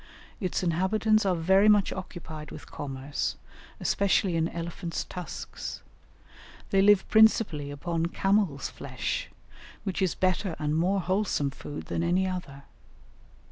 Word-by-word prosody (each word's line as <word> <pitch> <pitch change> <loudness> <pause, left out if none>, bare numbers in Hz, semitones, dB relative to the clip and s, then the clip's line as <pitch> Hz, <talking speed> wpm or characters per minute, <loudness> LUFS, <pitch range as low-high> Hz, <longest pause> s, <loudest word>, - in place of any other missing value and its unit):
Its 185 -3 -1
inhabitants 200 +5 +2
are 185 - +3
very 190 +5 +4
much 205 -2 +4
occupied 160 -5 -7
with 145 - -11
commerce, 135 - -3 0.4
especially 195 -2 +2
in 165 0 +2
elephants' 170 +1 -4
tusks. 180 -1 -7 0.9
They 195 - +4
live 200 -1 +5
principally 215 -9 +4
upon 165 +3 -2
camels' 195 -6 +1
flesh, - - -4 0.5
which 195 -2 -2
is 185 -3 +1
better 185 -1 0
and 150 0 -1
more 185 +4 +2
wholesome 185 -6 0
food 145 +2 -7
than - - -2
any 175 +3 +2
other. 175 -7 -5
180 Hz, 125 wpm, -28 LUFS, 155-195 Hz, 0.9 s, live